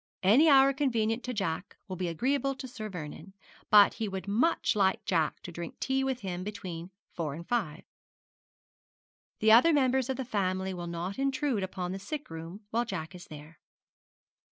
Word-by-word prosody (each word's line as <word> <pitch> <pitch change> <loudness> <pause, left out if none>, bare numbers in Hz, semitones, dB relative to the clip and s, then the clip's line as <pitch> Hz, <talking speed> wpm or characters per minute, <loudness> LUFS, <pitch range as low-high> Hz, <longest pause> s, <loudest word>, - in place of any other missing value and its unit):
Any 250 - +6
hour 275 -1 +6
convenient 235 -4 0
to 250 - -3
Jack 180 -2 -3
will 190 - -5
be 180 0 -2
agreeable 275 - 0
to 260 - -7
Sir 220 -3 -7
Vernon, 170 +1 -8 0.4
but 205 -1 +7
he 220 - -3
would 190 0 -5
much 230 +10 +2
like 190 -2 +2
Jack 165 -4 0
to 175 - -7
drink 170 0 -7
tea 265 0 0
with 265 -2 -2
him 185 -2 -4
between 185 -5 -6 0.2
four 155 -5 -3
and 170 +2 -9
five. 205 -11 -1 1.6
The 220 0 +5
other 245 +9 +7
members 265 -3 +2
of 265 - -1
the 265 - -3
family 190 -4 -1
will 175 -1 -6
not 170 +6 -4
intrude 270 -4 0
upon 185 -1 -4
the 190 - -4
sick 280 - -6
room 165 +5 -8
while 235 +2 +1
Jack 190 -7 -5
is 180 0 -11
there.' 150 +1 -12
200 Hz, 180 wpm, -30 LUFS, 175-255 Hz, 1.6 s, but